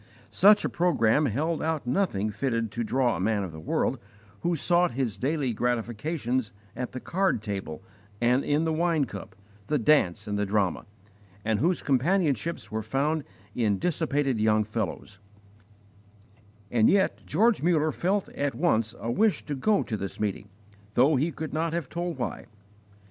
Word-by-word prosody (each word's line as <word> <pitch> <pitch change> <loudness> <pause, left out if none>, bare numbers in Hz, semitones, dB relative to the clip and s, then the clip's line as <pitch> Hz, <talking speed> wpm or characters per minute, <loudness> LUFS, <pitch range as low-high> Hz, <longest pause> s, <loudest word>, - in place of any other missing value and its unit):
Such 205 +1 +5
a - - 0
programme 150 -5 +2
held 155 +8 -1
out 160 -4 -1
nothing 120 - 0
fitted 115 -1 -1
to 120 +2 -2
draw 125 +1 +1
a - - -4
man 105 +1 +1
of 90 - -5
the 80 - -9
world 80 - -1 0.4
who 175 0 0
sought 175 0 +2
his 120 -7 -1
daily 140 -2 -1
gratifications 120 +2 -1 0.2
at 125 +1 -5
the 130 - -4
card 185 - 0
table 100 -7 -5 0.4
and 125 +3 +3
in 145 +2 +1
the 160 -1 0
wine 165 -2 +1
cup, 105 -4 -9 0.3
the 150 - +1
dance 110 - +2
and 105 0 -2
the 105 - +1
drama, 100 -3 0 0.6
and 110 -1 +1
whose 170 +6 +1
companionships 155 - 0
were 110 0 -2
found 145 +7 0 0.3
in 105 -4 +1
dissipated 145 - 0
young 110 0 +3
fellows; 105 -2 -4 1.5
and 115 -2 +4
yet 195 -1 +2
George 220 +7 +3
Muller 155 -2 +2
felt 190 +5 0
at 140 -3 -2
once 115 -7 +1
a 115 - -3
wish 215 - +1
to 150 - -3
go 200 +10 +2
to 110 - -3
this 100 -2 -5
meeting, 105 -1 -3 0.5
though 140 +5 +5
he 150 +6 +1
could 155 -2 -6
not 160 +1 -1
have 170 -6 -3
told 170 -2 -3
why. 125 - -4
130 Hz, 165 wpm, -27 LUFS, 110-160 Hz, 1.5 s, Such